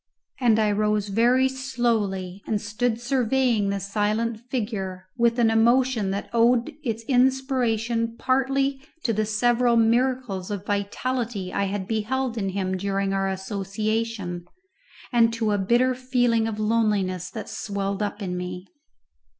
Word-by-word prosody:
And 235 -4 +4
I 215 -1 +2
rose 210 0 0
very 240 +5 +4
slowly 225 -8 -1
and 215 - 0
stood 220 +3 -1
surveying 245 -3 +1
the 200 0 -1
silent 215 +3 -1
figure 200 -6 -3
with 235 0 +2
an 230 -2 +4
emotion 235 -1 +3
that 200 +1 -3
owed 235 +1 +3
its 230 -3 -3
inspiration 245 -3 +1
partly 270 +1 +1 0.2
to 230 - +1
the 215 0 0
several 240 +2 +2
miracles 230 -4 +1
of 205 -1 -4
vitality 205 0 -2
I 200 - +1
had 195 -1 -3
beheld 235 +3 -1
in 200 -4 -1
him 190 -1 -2
during 195 0 -1
our 195 0 0
association, 200 -1 -3 0.7
and 230 -1 +5
to 225 -2 0
a 205 - +1
bitter 240 +6 +3
feeling 245 -3 +1
of 220 -2 -4
loneliness 210 -5 0
that - - -7
swelled 200 -1 -3
up 210 0 -3
in 180 -2 -3
me. 180 0 -5
225 Hz, 140 wpm, -24 LUFS, 200-245 Hz, 0.7 s, and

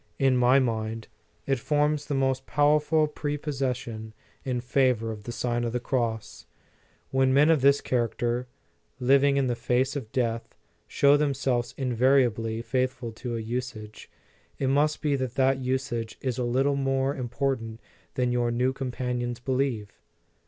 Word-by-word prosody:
In 135 -1 +3
my 125 +2 +5
mind, 115 -3 -1 0.4
it 135 -2 0
forms 150 +2 0
the 145 - -1
most 135 0 0
powerful 150 +2 +3
prepossession 130 -7 -4 0.3
in 125 -2 -2
favor 125 -2 +1
of 105 -2 -9
the 120 - -4
Sign 120 0 -1
of 120 -1 -2
the 125 - 0
Cross. 120 -4 -3 0.6
When 130 0 +3
men 150 +3 +6
of 155 -4 +3
this 140 +1 +4
character, 120 0 -1 0.5
living 140 +2 +4
in 135 - +2
the 120 -1 0
face 125 +3 0
of 120 -6 -5
death, 115 -2 -2 0.3
show 140 +1 +4
themselves 135 -4 0
invariably 120 -3 +1
faithful 125 0 -2
to 120 +1 -5
a - - -3
usage, 110 -2 -6 0.5
it 135 - 0
must 150 +2 +1
be 145 -2 +2
that 130 -2 -3
that 135 0 +2
usage 125 -3 -2
is 130 -2 -3
a - - 0
little 135 +4 +1
more 135 0 0
im 125 -2 -4
portant 115 -3 -2 0.4
than 125 -1 +1
your 120 -1 +1
new 125 +2 +1
companions 125 -2 -3
believe. 125 -5 -1
125 Hz, 150 wpm, -27 LUFS, 120-135 Hz, 0.6 s, men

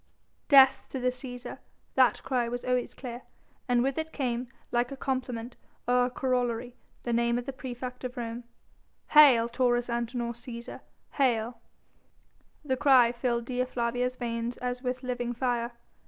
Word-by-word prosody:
"Death 270 -2 +7
to 265 - -4
the 250 0 +2
Cæsar!" 250 -1 -7 0.3
That 255 -2 +3
cry 250 -3 0
was 245 +1 -4
always 250 -1 0
clear, 245 -2 -7 0.5
and 245 -1 +3
with 270 +3 0
it 320 0 -4
came, 250 -4 -2 0.2
like 240 +1 +1
a 275 - -6
complement 255 -3 -3 0.3
or 250 0 +4
a - - -1
corollary, 245 -1 -1 0.3
the 240 - -1
name 235 0 +2
of 245 - -4
the 275 - -5
praefect 250 -1 -7
of 250 +1 -5
Rome. 235 0 -4 0.7
"Hail 270 -7 +7
Taurus 245 0 +1
Antinor 235 0 -2
Cæsar! 235 0 -8 0.3
Hail!" 235 -3 0 1.0
The 260 -2 0
cry 255 -4 +6
filled 240 -1 -1
Dea 250 0 0
Flavia's 250 0 -1
veins 235 -1 -3
as 250 0 -3
with 255 0 -3
living 245 -1 -2
fire. 240 -1 -1
245 Hz, 155 wpm, -29 LUFS, 235-255 Hz, 1.0 s, Death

